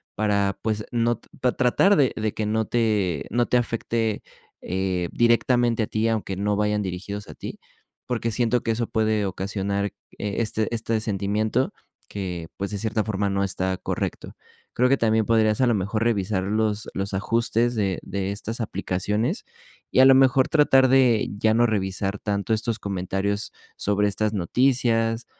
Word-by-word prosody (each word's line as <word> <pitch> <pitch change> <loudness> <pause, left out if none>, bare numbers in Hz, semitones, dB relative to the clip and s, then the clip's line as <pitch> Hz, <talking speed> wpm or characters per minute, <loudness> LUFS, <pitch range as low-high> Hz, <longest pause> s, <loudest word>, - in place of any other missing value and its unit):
para, 100 -2 +1
pues 110 -1 -2
no, 120 -1 +1 0.2
para 125 -1 +1
tratar 130 +11 +4
de 135 -4 +3
de 110 -1 -2
que 110 - -2
no 110 +1 0
te 105 -10 0
no 120 0 +1
te 125 - +3
afecte, 115 -2 -1 0.4
eh 95 -1 -2
directamente 120 0 +3
a - - -3
ti, 110 +1 0
aunque 110 -4 -1
no 105 +1 0
vayan 105 0 +1
dirigidos 100 +2 -5
a - - -8
ti. - - -8 0.5
Porque 115 -2 -1
siento 120 +1 +1
que - - -3
eso 115 +1 -1
puede 110 -2 +1
ocasionar, 100 +1 -2 0.3
eh, 105 -1 -3
este 110 -1 -1
este 115 0 -1
sentimiento 105 +4 -1 0.4
que, 90 -5 -5
pues, 100 0 -3
de 105 - -3
cierta 110 +1 0
forma 100 -2 -1
no 100 0 0
está 95 -1 -1
correcto. - - -4 0.4
Creo 125 - +3
que 135 - +4
también 110 -2 +2
podrías, 110 0 +2
a 130 - +4
lo 120 - +3
mejor, 105 +3 -1
revisar 100 -4 0
los 105 +1 -1
los 100 +1 -3
ajustes 115 +3 +1
de 100 -5 0
de 95 0 -3
estas 110 +4 -5
aplicaciones, 105 - -2 0.5
y, - - +2
a - - +8
lo 135 - +8
mejor, 130 0 +4
tratar 135 -4 +5
de 125 -4 +4
ya 110 0 +3
no 120 +1 +4
revisar 100 -1 -2
tanto 100 +1 -1
estos 110 0 0
comentarios 100 +1 -2 0.3
sobre 105 0 +1
estas 105 +1 0
noticias. 115 - +1
110 Hz, 170 wpm, -24 LUFS, 100-115 Hz, 0.5 s, a